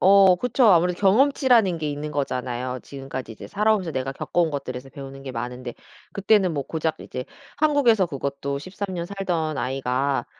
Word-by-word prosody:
어 195 -1 +7
그쵸. 250 +5 +1
아무래도 180 -2 +4
경험치라는 225 -3 +4
게 155 -1 -2
있는 145 +1 -4
거잖아요. 130 -3 -3
지금까지 135 -4 -7
이제 - - -10
살아오면서 210 -4 +1
내가 130 +1 -2
겪어온 170 +4 0
것들에서 135 -2 -5
배우는 135 -1 -9
게 130 -1 -6
많은데 125 +1 -5 0.4
그때는 200 -2 +3
뭐 140 -3 -2
고작 160 +1 -2
이제 125 0 -6 0.3
한국에서 280 -10 +4
그것도 140 -1 -3
13 190 +4 -6
년 170 0 -3
살던 175 -6 -2
아이가 135 +1 -1
155 Hz, 385 characters per minute, -24 LUFS, 135-195 Hz, 0.4 s, 어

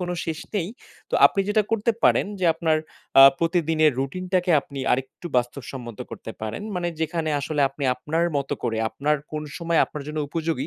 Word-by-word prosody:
কোনো 180 0 -2
শেষ 160 -1 -3 0.2
নেই, 180 -4 0 0.4
তো - - -1
আপনি 195 - -1
যেটা 210 0 +3
করতে 225 +1 +2
পারেন - - +4
যে, - - 0
আপনার 160 -1 +1 0.4
আ - - +12 0.2
প্রতিদিনের 165 -2 +2
রুটিনটাকে 180 +6 -1
আপনি 140 0 -10
আরেকটু 130 +6 -3
বাস্তবসম্মত 120 -2 -3
করতে - - -7
পারেন, 110 - -4
মানে 175 -1 -1
যেখানে 160 0 -1
আসলে 145 +1 -2
আপনি 140 +1 -6
আপনার 160 +6 -1
মতো 140 -1 -1
করে, 115 -2 -1
আপনার 150 +5 0 0.2
কোন 155 0 -3 0.2
সময় 170 -1 +1
আপনার 150 - -8
জন্য 155 - -4
উপযোগী? 160 -3 -2
155 Hz, 175 wpm, -24 LUFS, 135-175 Hz, 0.4 s, আ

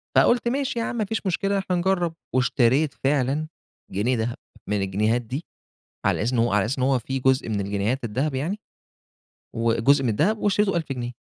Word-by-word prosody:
فقُلت 240 0 +4
ماشي 260 -1 -1
ياعم 230 - -2
ما 220 -3 0
فيش 220 +1 -3
مشكلة 195 +2 0
إحنا 190 -2 -1
نجرب، 175 -2 +1 0.2
واشتريت 130 +3 +3
فعلًا 140 +2 0 0.4
جنيه 110 +7 +1
دهب 120 +1 -2 0.3
من 105 -1 +1
الجنيهات 105 +5 +1
دي، 130 +8 -5 0.6
على - - +2
أساس 120 +5 0
إن 120 - +2
هو 115 -2 +2
على 105 -1 +3
أساس 125 +6 -2
إن 130 - 0
هو 130 -1 +3
في 135 +3 -3
جزء 130 -2 +2
من 105 -2 -1
الجنيهات 100 +6 -1
الدهب 130 +6 -1
يعني، 165 +11 -2 1.0
وجزء 115 +5 +3
من 125 - +1
الدهب 165 - +2
واشتريته 205 -1 +2
ب1000 170 -3 -1
جنيه، 120 -2 -3
135 Hz, 185 wpm, -24 LUFS, 115-175 Hz, 1.0 s, فقُلت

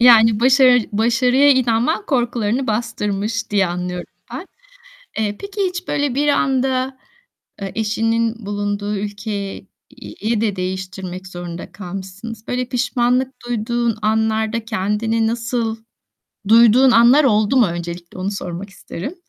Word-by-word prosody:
Yani, 225 -2 +6
başarı 255 -1 +6
başarıya 245 +5 +3
inanman 255 - +2
korkularını 240 -2 0
bastırmış 215 -1 -2
diye 195 -3 +3
anlıyorum 180 0 -4 0.3
ben. - - -6 0.7
Eee, 210 -2 -1
peki, 400 +1 -6
hiç 360 0 -7
böyle 285 -3 0
bir 290 +2 +1
anda, 265 -1 +1 0.6
eee, 195 - -4
eşinin 225 0 0
bulunduğu 205 0 -2
ülke 205 +2 -5 0.9
yi 220 +1 0
de 210 -3 0
değiştirmek 185 0 -5
zorunda 175 -1 -7
kalmışsınız. 195 +4 -8
Böyle, 250 0 -1
pişmanlık 250 +1 0
duyduğun 235 0 -1
anlarda 220 +1 0
kendini 220 +1 0
nasıl 230 -1 -2 0.7
duyduğun 235 +3 +6
anlar 245 +5 +6
oldu 215 0 +3
mu 240 -5 +6
öncelikle 170 +1 -6
onu 190 +2 -2
sormak 195 0 -6
isterim. 195 - -7
225 Hz, 120 wpm, -19 LUFS, 205-245 Hz, 0.9 s, Yani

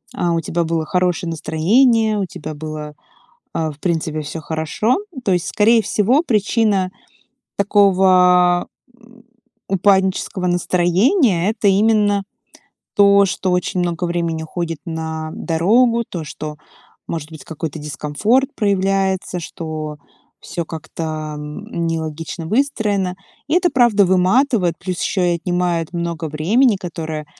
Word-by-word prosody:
а, 175 -1 0
у 165 - 0
тебя 170 +2 -1
было 165 -1 -1
хорошее 180 -1 0
настроение, 215 - +2
у 195 - 0
тебя 175 -3 -8
было, 155 0 -6 0.6
а, 160 -1 -1
в 145 - -15
принципе, 160 -2 -1
всё 150 +2 -6
хорошо. 160 +10 -1 0.3
То 195 - +2
есть, 175 -2 -1
скорее 225 +2 +4
всего, 220 +8 +2
причина 210 - +1 0.7
такого, 185 -3 +4 0.3
м, 240 0 -20 0.5
упаднического 190 -1 +1
настроения- 180 - +2
это 215 -2 +1
именно 205 0 +3 0.7
то, 200 0 +6
что 185 0 -2
очень 180 0 0
много 175 0 -1
времени 170 -2 -2
уходит 165 -1 -4
на 160 -1 -4
дорогу, 230 +9 +2
то, 170 -3 -5
что, 150 +1 -7 0.5
может 160 -1 -5
быть, 155 - -10
какой-то 160 -1 -5
дискомфорт 150 - 0
проявляется, 195 -3 0
что 155 -2 -6 0.4
всё 170 -1 -5
как-то 155 -1 -5
нелогично 160 +2 -4
выстроено. 210 -6 0 0.3
И 300 - +1
это 355 0 +3
правда 235 -5 +4
выматывает, 185 - +2
плюс 180 -1 -4
еще 180 -3 +1
и - - 0
отнимает 175 -1 -1
много 170 -1 -3
времени, 205 - +2
которое 160 -4 -5
180 Hz, 125 wpm, -19 LUFS, 160-205 Hz, 0.7 s, то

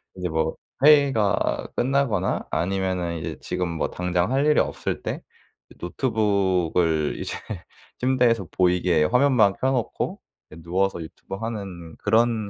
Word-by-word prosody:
인제 90 -1 -3
뭐 80 0 -1 0.3
회의가 140 -9 +3
끝나거나 135 -3 0
아니면은 95 -2 -1
이제 80 - -5
지금 90 -1 -2
뭐 85 -1 -2
당장 90 +3 -1
할 135 +2 +2
일이 150 0 +4
없을 - - -3
때 - - -3 0.5
이 - - -15
노트북을 90 - +1
이제 - - -4 0.6
침대에서 125 -6 +2
보이게 90 -3 +2
화면만 125 - +4
켜 130 - +2
놓고 125 -4 -2 0.3
이 - - -11
누워서 90 +1 0
유튜브 80 +4 -10
하는 100 -7 -6
그런 110 -2 +1
95 Hz, 280 characters per minute, -24 LUFS, 90-120 Hz, 0.6 s, 일이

